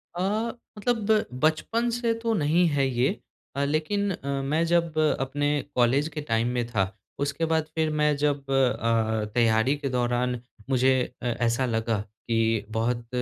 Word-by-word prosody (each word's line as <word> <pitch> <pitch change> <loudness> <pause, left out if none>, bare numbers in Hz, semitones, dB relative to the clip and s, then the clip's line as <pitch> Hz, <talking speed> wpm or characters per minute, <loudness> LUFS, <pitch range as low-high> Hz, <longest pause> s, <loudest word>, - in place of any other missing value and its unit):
अ, 180 - -2 0.6
मतलब 220 -1 +1 0.2
बचपन 225 +10 +1
से 235 -1 +1
तो 230 -1 +1
नहीं 165 0 +3
है 140 -2 +1
ये 125 +1 +1 0.5
अ, 140 - 0
लेकिन 180 +8 0
अ, 140 -6 -6 0.2
मैं 160 +2 +2
जब 170 -2 +1 0.2
अपने 145 +2 0 0.2
कॉलेज 130 +5 +3
के 150 - -2
टाइम 115 +1 +2
में 120 - 0
था, 110 -5 +1 0.4
उसके 140 +3 -1
बाद 160 -1 +1
फिर 160 -1 +1
मैं 150 -1 +3
जब 145 -1 0
अ, 115 -4 +1
तैयारी 115 +3 +3
के 140 -2 -3
दौरान 125 0 0 0.3
मुझे 130 0 +4 0.3
अ, - - -6
ऐसा 120 +2 +1
लगा 115 -2 0
कि 115 0 -1
बहुत 115 +1 -1
135 Hz, 155 wpm, -26 LUFS, 120-160 Hz, 0.6 s, मुझे